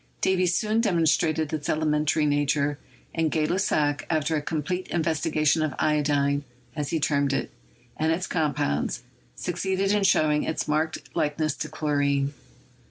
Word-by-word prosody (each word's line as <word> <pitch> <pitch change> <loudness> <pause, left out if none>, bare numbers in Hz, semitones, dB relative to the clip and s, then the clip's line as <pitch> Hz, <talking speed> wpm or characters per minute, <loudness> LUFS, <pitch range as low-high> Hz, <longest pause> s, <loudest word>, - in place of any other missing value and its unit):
Davy 185 -1 +2
soon 215 +5 +1
demon 180 -7 +2
strated 160 -1 +1
its 150 -2 -3
elementary 150 0 +1
nature, 145 0 +1 0.3
and 165 -1 +1
Gay 155 0 +1
Lussac, 155 -5 +1
after 160 0 +1
a 150 - 0
complete 165 +5 -3
investigation 160 -1 +1
of 155 -4 -1
iodine, 145 -2 +1 0.3
as 150 -3 -3
he 165 - 0
termed 140 -2 +1
it, 135 - -2 0.5
and 160 +1 +1
its 180 +3 0
compounds, 145 - -1 0.3
succeeded 190 +2 -1
in 205 -1 +2
showing 155 -5 +3
its 160 - -2
marked 155 +1 -2
likeness 150 0 0
to - - -4
chlorine. 145 -2 0
155 Hz, 145 wpm, -26 LUFS, 145-165 Hz, 0.5 s, showing